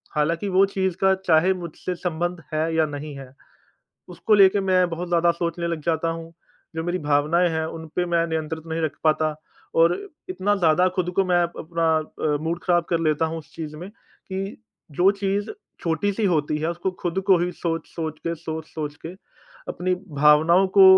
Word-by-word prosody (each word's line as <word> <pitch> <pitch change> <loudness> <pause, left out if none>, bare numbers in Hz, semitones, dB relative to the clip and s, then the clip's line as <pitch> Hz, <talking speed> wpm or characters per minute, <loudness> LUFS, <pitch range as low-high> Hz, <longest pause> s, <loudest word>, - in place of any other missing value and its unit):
हालाँकि 165 +6 0
वो 190 +1 +5
चीज़ 190 -2 -1
का 190 0 +6
चाहे 170 +3 +5
मुझसे 180 0 -5
संबंध 175 0 -3
है 160 +1 0
या 160 -1 +3
नहीं 145 0 -6
है। 130 -1 -11 0.8
उसको 215 - +1
लेके 200 0 +6
मैं 185 -2 +3
बहुत 170 +2 -4
ज़्यादा 170 0 +3
सोचने 170 0 -3
लग 170 -2 -2
जाता 165 0 0
हूँ। 165 0 -7 0.4
जो 160 - -1
मेरी 175 +1 -1
भावनाएँ 150 +3 +2
हैं 160 0 -1
उनपे 160 +2 -4
मैं 170 -1 +1
नियंत्रित 160 0 -3
नहीं 165 0 -3
रख 155 - 0
पाता 155 0 +2 0.4
और 165 +1 +5 0.3
इतना 205 - 0
ज़्यादा 175 -1 +3
ख़ुद 180 -1 0
को 195 - +4
मैं 175 -1 +3
अपना 170 -1 -2 0.5
अ, - - +2
मूड 165 +2 -2
ख़राब 175 -2 +3
कर 170 -1 +2
लेता 155 0 +1
हूँ 165 +1 -4
उस 155 - -13
चीज़ 155 -2 -6
में 175 +5 -8 0.4
कि 195 +1 -4 0.4
जो 180 +7 +4
चीज़ 200 +1 -2 0.3
छोटी-सी 195 +6 0
होती 155 -4 +1
है 160 +2 -1
उसको 175 +2 -2
ख़ुद 175 +1 -2
को 190 -3 +6
ही 175 +1 0
सोच-सोच 165 -2 -4
के 170 - 0
सोच-सोच 160 -2 -6
के - - -5 0.6
अपनी 185 - -1 0.2
भावनाओं 155 +6 +5
को 195 - +10
170 Hz, 180 wpm, -23 LUFS, 160-180 Hz, 0.8 s, को